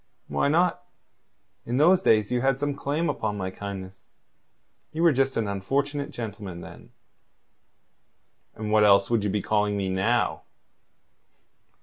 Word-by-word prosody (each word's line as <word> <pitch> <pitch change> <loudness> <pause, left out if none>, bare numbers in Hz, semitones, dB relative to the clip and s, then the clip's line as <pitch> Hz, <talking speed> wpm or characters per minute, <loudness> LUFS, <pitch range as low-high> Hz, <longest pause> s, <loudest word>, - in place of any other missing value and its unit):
"Why - - +1
not? 160 - +2 0.8
In 120 +2 -2
those 175 +6 +5
days 110 - +3
you 125 -1 +1
had 135 0 +2
some 145 +1 -1
claim 145 +4 -2
upon 105 -8 -2
my 95 -1 -3
kindness. 95 -2 -8 0.9
You 160 +2 -1
were 170 - +6
just 135 0 0
an 110 -2 0
unfortunate 140 +9 -2
gentleman 100 -6 -7
then." - - -12 1.7
"And 105 -1 -5
what 105 0 +5
else 100 0 +5
would 115 -3 +2
you 105 - 0
be 100 0 -1
calling 105 -1 +1
me 95 -1 -2
now?" 95 0 0
110 Hz, 140 wpm, -25 LUFS, 100-140 Hz, 1.7 s, were